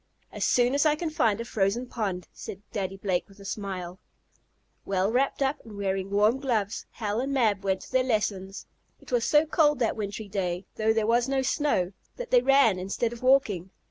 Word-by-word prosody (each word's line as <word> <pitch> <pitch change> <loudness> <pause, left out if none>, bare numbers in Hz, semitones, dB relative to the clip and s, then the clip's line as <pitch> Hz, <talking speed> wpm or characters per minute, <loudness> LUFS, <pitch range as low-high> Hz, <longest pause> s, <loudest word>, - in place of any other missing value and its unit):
"As - - -4
soon 245 +1 +3
as 280 - +3
I 305 -1 +4
can 315 0 -3
find 230 -10 +2
a 230 - -4
frozen 215 +3 0
pond," 200 -8 -3
said 200 +1 -9
Daddy 195 -2 -3
Blake 190 -1 -1
with 195 +1 -18
a 200 - -12
smile. 190 -2 -5 0.8
Well 195 +1 0
wrapped 270 +3 +1
up, 275 +2 0
and 215 -3 -11
wearing 195 -1 -2
warm 210 +5 +3
gloves, 225 -6 -1
Hal 215 -1 -2
and 270 +2 -2
Mab 220 -7 +2
went 190 -1 0
to - - -12
their 260 0 +3
lessons. 205 -5 -2 0.3
It - - -15
was 240 -2 +2
so 300 +1 +4
cold 300 -2 +3
that 235 -3 0
wintry 205 0 -5
day, 185 -2 -2
though 220 0 +2
there 220 -1 +1
was 240 +3 +2
no 270 -1 +1
snow, 255 - +1 0.2
that - - -7
they - - +6
ran 270 - +4
instead 200 +5 -2
of 235 - -10
walking. 240 -9 +2
220 Hz, 205 wpm, -27 LUFS, 195-260 Hz, 0.8 s, they